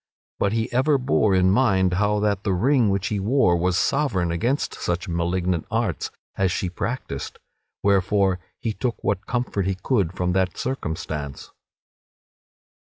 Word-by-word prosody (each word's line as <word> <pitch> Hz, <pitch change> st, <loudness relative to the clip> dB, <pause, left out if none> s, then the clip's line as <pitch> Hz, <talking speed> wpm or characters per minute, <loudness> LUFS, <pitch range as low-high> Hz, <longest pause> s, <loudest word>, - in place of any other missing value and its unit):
But 100 Hz, -, +1 dB
he 115 Hz, +1 st, -1 dB
ever 140 Hz, +4 st, +3 dB
bore 120 Hz, -6 st, +2 dB
in 95 Hz, 0 st, +4 dB
mind 95 Hz, -5 st, +3 dB
how 105 Hz, +2 st, +2 dB
that 100 Hz, -2 st, 0 dB
the 100 Hz, -, +1 dB
ring 120 Hz, +4 st, +3 dB
which 100 Hz, +2 st, 0 dB
he 105 Hz, -, -1 dB
wore 105 Hz, -3 st, +3 dB
was 90 Hz, +1 st, +1 dB
sovereign 105 Hz, -, +1 dB
against 120 Hz, +12 st, 0 dB
such 90 Hz, +2 st, -2 dB
malignant 85 Hz, 0 st, -1 dB
arts -, -, -1 dB, 0.3 s
as 95 Hz, -2 st, +2 dB
she 90 Hz, -1 st, -2 dB
practised, 105 Hz, -, -4 dB, 0.5 s
wherefore 100 Hz, -1 st, +2 dB, 0.2 s
he 110 Hz, -, -3 dB
took 120 Hz, +2 st, -3 dB
what 100 Hz, 0 st, -1 dB
comfort 120 Hz, -6 st, -1 dB
he 95 Hz, -, 0 dB
could 95 Hz, -4 st, 0 dB
from 90 Hz, -1 st, -1 dB
that 95 Hz, -1 st, 0 dB
circumstance. 80 Hz, -, -4 dB
95 Hz, 150 wpm, -23 LUFS, 90-115 Hz, 0.5 s, in